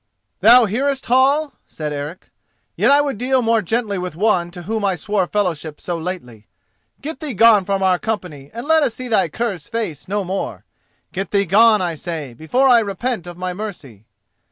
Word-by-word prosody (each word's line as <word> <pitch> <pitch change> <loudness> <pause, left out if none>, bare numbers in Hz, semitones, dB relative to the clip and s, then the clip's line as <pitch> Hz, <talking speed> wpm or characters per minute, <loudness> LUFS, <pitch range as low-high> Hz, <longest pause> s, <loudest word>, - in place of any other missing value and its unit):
_" - - -52 0.4
"Thou 235 +4 +7
hearest, 270 +6 -1
Hall?" 275 +4 +3
said 150 -1 -5
Eric. 145 +5 -7 0.4
"Yet - - +2
I 285 +1 +6
would 280 -7 -3
deal 255 0 +1
more 225 -1 +2
gently 210 0 -1
with 180 -3 -5
one 180 -2 +1
to 175 0 -10
whom 220 +3 -3
I 195 -2 +1
swore 190 +2 -1
fellowship 165 -7 -2
so 175 - -4
lately. 125 - -7 0.5
Get 315 +3 -6
thee 295 -7 -5
gone 215 -2 +6
from 195 0 -1
our 185 -1 +3
company, 180 -11 -5
and 235 +5 -7
let 320 0 +4
us 245 -6 0
see 255 - -6
thy 215 -7 +2
cur's 200 -3 -4
face 225 - -4
no 205 +1 -1
more. 190 +2 -4 0.5
Get 195 +1 -4
thee 200 -1 +1
gone, 210 +2 +5
I 175 -2 -1
say, 155 -5 -6
before 200 - +1
I 245 -2 +7
repent 210 -1 -3
of 175 -1 -9
my 180 0 -3
mercy." 155 - -8
200 Hz, 195 wpm, -19 LUFS, 175-235 Hz, 0.5 s, Thou